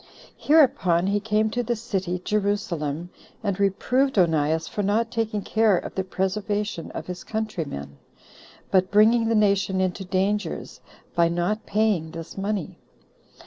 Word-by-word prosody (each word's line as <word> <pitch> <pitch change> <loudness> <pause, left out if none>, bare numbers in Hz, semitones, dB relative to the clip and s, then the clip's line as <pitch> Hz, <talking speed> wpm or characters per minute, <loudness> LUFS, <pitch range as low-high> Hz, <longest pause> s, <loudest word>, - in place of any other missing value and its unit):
Hereupon 190 - +3
he 200 +1 +1
came 215 +1 +1
to 245 - 0
the 240 0 -1
city 195 -6 -2
[Jerusalem], 175 -6 -1 0.3
and 200 -2 -1
reproved 250 +7 +1
Onias 160 -2 +2
for 210 - -3
not 220 +3 +1
taking 220 -3 -2
care 220 -4 +3
of - - -5
the 190 - -1
preservation 195 0 -2
of - - -5
his 180 -1 -7
countrymen, 160 - -4 0.7
but 185 -1 +3
bringing 225 +3 +4
the 230 - +2
nation 200 -2 +2
into 185 +1 -1
dangers, 195 +3 -2 0.3
by 170 -1 +3
not 175 +6 -1
paying 205 -6 +1
this 165 0 -8
money. 200 -2 -3
200 Hz, 140 wpm, -24 LUFS, 180-215 Hz, 0.7 s, bringing